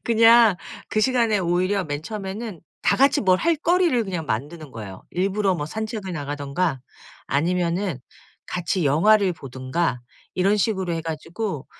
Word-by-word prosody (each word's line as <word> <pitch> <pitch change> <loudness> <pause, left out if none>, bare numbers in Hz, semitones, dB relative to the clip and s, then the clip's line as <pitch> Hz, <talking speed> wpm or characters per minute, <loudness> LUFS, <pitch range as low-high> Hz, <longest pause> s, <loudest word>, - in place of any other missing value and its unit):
그냥 230 -3 +6 0.3
그 215 - 0
시간에 230 -3 +2
오히려 185 +2 +1
맨 145 0 -4
처음에는 205 -1 -6 0.2
다 - - +3
같이 275 +1 +4
뭘 185 -3 +4
할 335 0 +2
거리를 335 -6 +2
그냥 175 -5 -4
만드는 145 +5 -4
거예요. 100 -4 -8
일부러 195 +1 0
뭐 150 -3 -3
산책을 215 -1 -5
나가든가 145 0 -2 0.5
아니면은 175 +1 0 0.5
같이 175 -1 -1
영화를 185 +7 +4
보든가 130 0 -3 0.3
이런 195 +3 +2
식으로 190 -4 0
해 165 - -2
가지고 165 +1 -4
185 Hz, 315 characters per minute, -23 LUFS, 155-215 Hz, 0.5 s, 그냥